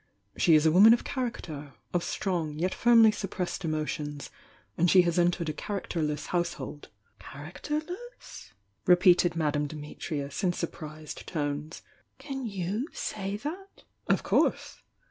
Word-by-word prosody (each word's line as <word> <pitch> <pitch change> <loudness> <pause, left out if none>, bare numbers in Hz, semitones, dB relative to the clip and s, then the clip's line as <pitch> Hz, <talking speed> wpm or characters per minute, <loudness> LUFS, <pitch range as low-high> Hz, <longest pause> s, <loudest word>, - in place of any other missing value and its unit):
She 165 - +5
is 155 0 +4
a 160 - +5
woman 205 +7 +8
of - - -7
character 155 - -5
— - - -39
of 175 -1 +1
strong, 170 -5 -2
yet 180 +4 0
firmly 230 -2 +6
suppressed 195 -3 -4
emotions; 150 -2 -3 0.4
and 175 +6 +3
she 185 0 +7
has 170 0 +1
.entered 175 -1 +2
a - - -2
characterleas 155 -5 -3
household 175 -4 -3 0.2
" - - -40
"Characterless?" 305 - -7 0.4
repeated 180 -1 +5
Madame 150 -2 0
Dimitrius, 150 +1 -5
in 180 -2 +2
surprised 155 -3 -6
tones— 150 0 -3 0.3
"Can 270 -2 -5
you 200 - -2
say 200 -1 -4
that?" 360 - -7 0.2
"Of - - +2
course! - - +1
175 Hz, 135 wpm, -28 LUFS, 155-205 Hz, 0.4 s, woman